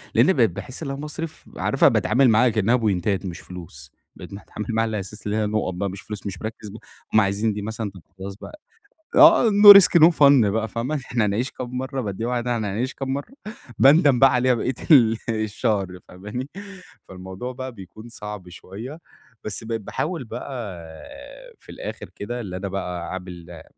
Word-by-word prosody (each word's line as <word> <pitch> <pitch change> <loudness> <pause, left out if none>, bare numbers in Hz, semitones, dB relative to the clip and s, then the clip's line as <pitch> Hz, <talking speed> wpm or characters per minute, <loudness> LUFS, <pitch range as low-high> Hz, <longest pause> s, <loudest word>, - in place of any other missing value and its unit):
لإني 190 - +5
بقيت 120 -7 +3
باحس 130 - -8
إن 140 - -4
أنا 135 - -5
باصرف 150 +2 -7
عارفة - - +3
باتعامل 130 0 +3
معاها 115 +3 +4
كأنها 110 +2 +2
بوينتات 100 -4 0
مش 90 -2 -6
فلوس 80 -6 -11 0.2
بقيت - - -11
متعامل 100 +1 -8
معاها 115 0 +1
على 110 -1 -3
أساس 100 +2 -9
اللي 105 +1 -1
هي 110 - 0
نقط 105 -3 -1
بَقى 95 +3 -3
مش 95 +1 -8
فلوس 105 -2 -8
مش 95 -2 -7
مركِّز 110 -1 -7
بق 110 - -10 0.3
هُم 110 - +6
عايزين 100 +2 0
دي 105 - -5
مثلًا 110 0 -5 0.3
خلاص 95 +1 -7
بَقى 305 - -12 0.6
آه 325 -8 +7
no 205 0 +10
risk 175 -3 +5
no - - +10
fun 140 -7 +5
بَقى 110 +1 -1
فاهمة؟ 120 +7 -3
إحنا 120 -5 -1
هنعيش 110 +6 -1
كام 125 0 -6
مرة 130 +1 -3
بادّيها 110 +1 -4
واحدة 125 0 -1
إحنا 110 -3 -2
هنعيش 125 +5 -2
كام 135 -1 -4
مرة 145 - -6 0.5
باندم 140 -2 +5
بَقى 135 -1 +6
عليها 125 0 +3
بقية 125 +2 -1 0.2
ال 115 -6 +6
الشهر 105 -4 -2
فاهماني؟ 105 +9 -7 0.6
فالموضوع 95 +6 -7
بَقى 130 +1 -6
بيكون 110 +2 -12
صعب 105 -5 -9
شوية 110 - -9 0.4
بس 110 0 -6
بقيت 115 0 -4
باحاول 160 - -4
بَقى 125 - -7 1.1
في - - -14
الآخر - - -8
كده 120 +4 -5
اللي 90 -5 -6
أنا 95 +2 -4
بَقى 90 -3 -5
عامل 90 -3 -9
110 Hz, 185 wpm, -23 LUFS, 100-130 Hz, 1.1 s, no